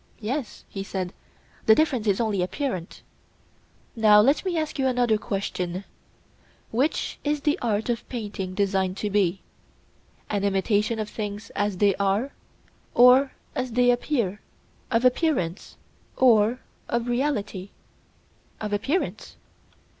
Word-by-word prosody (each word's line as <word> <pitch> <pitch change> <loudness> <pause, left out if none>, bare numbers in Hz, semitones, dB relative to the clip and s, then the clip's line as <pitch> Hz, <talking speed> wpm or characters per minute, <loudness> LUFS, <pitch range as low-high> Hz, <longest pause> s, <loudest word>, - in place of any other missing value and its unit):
Yes, 240 +3 -4
he 195 - -6
said, 190 -2 -4 0.5
the 220 - +8
difference 260 -7 +1
is 200 -1 +2
only 215 -5 0
apparent. 185 - -3 0.9
Now 215 -2 +6
let 270 +8 +4
me 365 -3 -1
ask 310 -2 -2
you 265 - +2
another 245 -4 +2
question: 190 -4 -3 0.9
Which 260 +7 0
is 295 0 0
the 295 0 +1
art 220 -2 0
of 240 -1 -3
painting 205 -6 -5
designed 190 -2 0
to 210 0 -2
be—an 200 +1 -4
imitation 205 +3 +1
of 215 -1 -2
things 210 0 -6
as 205 -2 -1
they 200 +1 +4
are, 200 +7 0 0.6
or 255 +3 +6 0.2
as 255 -2 -3
they 245 +1 +4
appear—of 235 -1 -3
appearance 250 - 0 0.4
or 235 -1 +4 0.3
of 235 0 0
reality? 220 -7 -1 0.9
Of 210 -1 -4
appearance. 275 - -2
215 Hz, 120 wpm, -25 LUFS, 200-250 Hz, 0.9 s, the